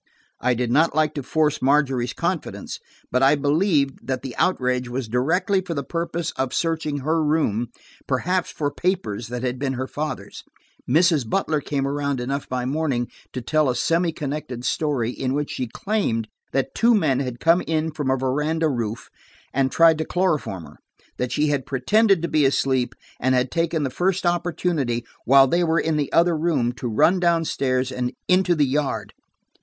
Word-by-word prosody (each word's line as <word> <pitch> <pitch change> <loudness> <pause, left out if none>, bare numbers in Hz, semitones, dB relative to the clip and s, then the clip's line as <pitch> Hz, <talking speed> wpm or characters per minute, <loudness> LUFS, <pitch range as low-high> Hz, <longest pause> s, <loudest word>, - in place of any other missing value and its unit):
I 125 -1 +1
did 120 0 -1
not 150 +3 +3
like 155 -1 +2
to 145 - -3
force 150 +2 0
Margery's 135 -3 +2
confidence, 175 0 -3 0.3
but 125 - +2
I 135 +2 +5
believed 145 -1 +1
that 130 -2 -2
the 125 -4 -6
outrage 125 -7 +1
was 125 -1 -3
directly 170 - +1
for 175 -3 -5
the 140 - -2
purpose 170 +2 -3
of 130 -1 -1
searching 160 -4 -1
her 160 +3 +1
room, 150 -7 +1 0.4
perhaps 175 +8 0
for 145 -2 -2
papers 170 - -2
that 125 +1 -5
had 125 0 -2
been 135 -1 -1
her 130 0 -3
father's. 150 +3 -5 0.5
Mrs. 155 -4 +3
Butler 155 -2 0
came 140 -1 -2
around 140 -1 -1
enough 135 +3 -3
by 125 -1 -2
morning, 135 -3 -1 0.2
to 125 - -5
tell 155 +2 +2
a 125 - 0
semi 165 +6 +1
connected 145 -4 -5
story 135 -5 0
in 130 +1 -2
which 145 0 -2
she 125 - -3
claimed 115 - -1 0.2
that 135 0 -1
two 235 0 +4
men 150 -10 +2
had 125 -3 -4
come 165 +2 +4
in 160 0 0
from 145 -3 -3
a 130 - +2
veranda 150 +5 0
roof, 115 -4 -3 0.5
and 135 -1 +1
tried 165 -1 +5
to - - +1
chloroform 155 - -1
her. - - -14 0.4
That 125 -1 -1
she 150 0 +1
had 140 -3 -1
pretended 195 - +3
to - - +1
be 155 -3 +2
asleep 135 -2 +1 0.2
and 130 +1 +2
had 125 0 +1
taken 165 -2 0
the 135 - -2
first 185 +6 0
opportunity, 170 -8 0 0.2
while 135 +2 +7
they 170 +6 +1
were 165 0 +2
in 160 -1 0
the 145 -2 -1
other 170 0 +4
room, 150 -7 +1
to 125 - -4
run 165 - +3
down 170 -2 +2
stairs 130 -3 0
and 125 -1 -2 0.2
into 180 -1 +3
the 150 -2 +3
yard. 140 +1 -2
145 Hz, 185 wpm, -23 LUFS, 130-165 Hz, 0.5 s, while